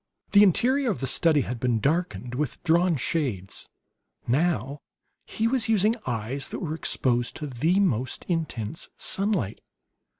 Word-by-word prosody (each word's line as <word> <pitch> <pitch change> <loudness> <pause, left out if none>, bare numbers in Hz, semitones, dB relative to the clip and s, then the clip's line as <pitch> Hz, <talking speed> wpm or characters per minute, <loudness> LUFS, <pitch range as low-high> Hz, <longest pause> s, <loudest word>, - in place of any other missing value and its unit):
The 205 - +7
interior 250 - +3
of 205 - -1
the 135 - -2
study 150 +3 +3
had 125 -2 -4
been 120 -2 +1
darkened 145 - -1
with 140 0 -3
drawn 170 +1 +3
shades; 125 - -3 0.6
now 145 +1 0 0.5
he 225 - 0
was 235 -2 +1
using 215 +1 +3
eyes 120 +3 -2
that - - -5
were 160 -4 -3
exposed 120 -6 0
to 150 - -5
the 155 +8 +1
most 130 - 0
intense 160 - -3
sunlight. 195 - -1
155 Hz, 140 wpm, -26 LUFS, 125-185 Hz, 0.6 s, The